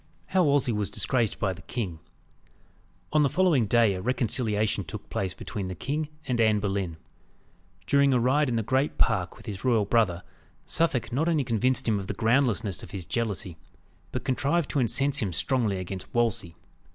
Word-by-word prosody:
XII. - - -16
How 185 -1 +4
Wolsey 140 -4 +2
was 105 -2 -1
disgraced 120 -5 0
by 95 -2 0
the 95 - -12
King. 95 -6 -4 1.1
On 155 - +5
the 140 - +3
following 165 - +2
day, 115 -1 +4
a 90 - -4
reconciliation 110 -3 0
took 80 - -9
place 95 -1 -2
between 95 0 -5
the 95 - -5
king 150 - -3 0.2
and 120 -2 0
Anne 110 -2 +3
Boleyn. 95 -5 -2 0.9
During 140 +5 +4
a 125 - +3
ride 135 +4 +2
in 120 - -1
the 115 - 0
great 130 +6 0
park - - +1
with - - -15
his 95 -3 -6
royal 115 -5 +3
brother, 95 -6 +1 0.4
Suffolk 135 -8 0
not 155 +6 +1
only 155 -4 +2
convinced 125 +1 +1
him 105 -3 +2
of 95 - -6
the 105 - -3
groundlessness 110 -4 +1
of - - -10
his 95 -4 -5
jealousy, 100 -2 -2 0.5
but - - -4
contrived 140 +5 0
to 145 - 0
incense 135 +4 +3
him 100 -4 0
strongly 105 - +1
against 95 0 -6
Wolsey. 110 -8 0
115 Hz, 185 wpm, -27 LUFS, 100-130 Hz, 1.1 s, On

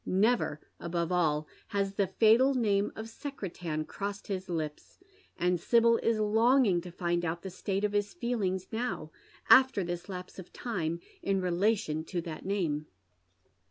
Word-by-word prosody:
Never, 200 -5 +2 0.2
above 170 0 -2
all, 155 -4 +2 0.2
has 200 -1 -1
the 200 -1 +1
fatal 230 +7 +4
name 205 -4 +2
of 220 0 -6
Secretan 180 - -5
crossed 200 +3 -5
Ids 190 -1 -3
lips; 155 -3 -4 0.4
and 180 0 +1
Sibyl 230 +4 +4
in 230 -1 +1 0.2
longing 230 -5 +4
to 180 0 -9
find 175 0 -1
out 170 0 -2
the 190 - -5
state 195 +2 -2
of 210 - +1
his 205 0 0
feelings 205 - -1
now, 225 -9 -3 0.4
after 260 -6 +6
this 175 +2 -5
lapse 180 0 -7
of 185 - -10
time, 170 -8 -3 0.2
in 195 -1 +1
relation 180 -3 +1
to 180 - -3
that 165 -2 -7
name. 160 -7 -1
190 Hz, 155 wpm, -30 LUFS, 170-220 Hz, 0.4 s, after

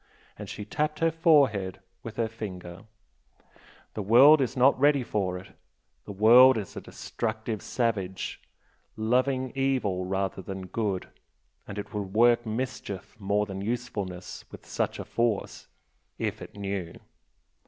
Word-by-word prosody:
and - - -9
she 105 - -6
tapped 150 +7 -1
her 165 0 +2
forehead 140 - +3 0.2
with 115 -1 -8
her 115 -1 0
finger 95 -4 -8 1.1
"The 110 - -4
world 130 +9 +7
is 130 0 -1
not 130 +2 +5
ready 140 -1 +4
for 95 -5 -2
it. 90 - -11 0.6
The - - -7
world 120 +5 +7
is 100 -4 -6
a - - -5
destructive 110 -1 -4
savage, 100 -6 -2 0.6
loving 130 +3 +1
evil 130 -9 0
rather 95 0 -2
than 95 +1 -6
good, 100 -1 -2 0.6
and 100 - -7
it 105 - -6
would 100 -1 -4
work 120 0 +4
mischief 110 -4 -5
more 100 +1 +1
than 95 -1 -6
usefulness 100 -5 -4
with - - -12
such - - -2
a - - -6
force 115 -3 -1 0.5
if - - -3
it - - -10
knew! 95 -4 -4
110 Hz, 140 wpm, -27 LUFS, 95-125 Hz, 1.1 s, world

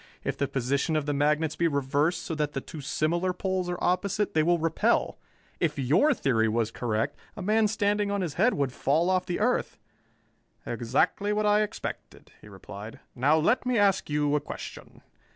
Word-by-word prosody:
"If - - -2
the 140 - -1
position 140 +5 -1
of 155 -2 0
the 145 - -1
magnets 150 +2 +1
be 170 - +2
reversed 145 +3 0
so - - -4
that 150 -1 -2
the - - -2
two 150 +3 -9
similar 170 +6 0
poles 185 -1 -2
are 175 - -2
opposite, 195 +3 0
they 155 - +3
will 175 +2 +3
repel. 165 0 +1 0.4
If 150 -3 0
your 160 - +3
theory 115 - +1
were 115 +1 +1
correct, 110 -2 -1 0.2
a 200 - -5
man 215 +2 +3
standing 205 -1 0
on 200 -1 -1
his 170 -6 -3
head 250 +9 +2
would 135 -3 -1
fall 160 +9 +1
off 185 -1 0
the 175 - -2
earth." 245 +4 0 0.9
"Exactly 205 +1 0
what 210 0 0
I 210 0 +4
expected," 210 - -6
he - - -14
replied. 100 +2 -10
"Now 145 +5 +3
let 165 +11 +2
me 250 -2 0
ask 200 -4 +2
you 150 0 +1
a 150 - +1
question. - - -9
160 Hz, 190 wpm, -27 LUFS, 140-200 Hz, 0.9 s, I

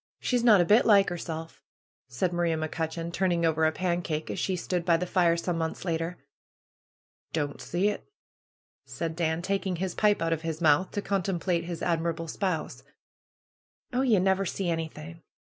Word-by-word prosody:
She's 245 -2 0
not 220 -5 +7
a 175 - +4
bit 215 +7 +5
like 200 -2 +6
'erself/^ 165 -2 -6 0.5
said 130 +8 -1
Maria 170 -2 +1
Mc 155 -1 -3
Cutcheon, 165 +1 -3
turning 175 -2 +1
over 160 0 +2
a 155 - +3
pancake, 170 -3 -2
as - - -4
she 190 - 0
stood 180 0 -2
by 170 -1 +3
the 180 - -2
fire, 175 -2 +2
some 170 0 -2
months 160 +3 -3
later. 165 0 -2 1.2
^^Don't 145 -3 -2
see 180 +4 0
it!" 210 - -3 0.8
said 165 -1 -4
Dan, 165 0 -1
taking 195 -1 -1
his 180 +1 -3
pipe 210 -1 +3
out 165 0 +1
of 160 - -3
his 160 -1 -4
mouth, 160 +2 +3
to 205 - -2
contemplate 180 -3 -1
his 170 -1 -5
admirable 165 -1 -1
spouse. 180 -1 -3 1.1
^^Oh, 250 - +2
ye 215 - +5
never 190 +1 +2
see 185 -1 -2
anything! 165 0 -5
170 Hz, 175 wpm, -28 LUFS, 165-185 Hz, 1.2 s, not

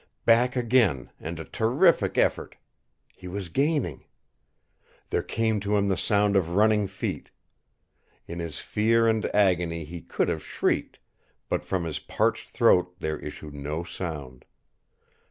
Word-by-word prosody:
Back 120 +2 +4
again 115 - +2
and 80 +1 -6
a 80 - -6
terrific 135 +10 +2
effort. - - +1 0.6
He 90 - -11
was 95 0 -5
gaining. 140 - 0 1.1
There - - +1
came 110 -1 0
to 105 +1 0
him 100 0 +1
the 95 - +2
sound 100 +3 +2
of 85 -3 +1
running 105 0 +4
feet. 95 0 -5 1.0
In 85 +1 -7
his 80 -4 -4
fear 115 +2 +2
and 110 -1 +2
agony 85 -5 +1
he 85 +2 -8
could - - -1
have - - -2
shrieked, - - -1 0.5
but - - -1
from 95 -2 -2
his 80 -3 -3
parched - - -1
throat 90 0 +3
there 80 -3 -3
issued 75 -2 -8
no 75 +3 -4
sound. 75 -8 -7
95 Hz, 140 wpm, -26 LUFS, 85-110 Hz, 1.1 s, Back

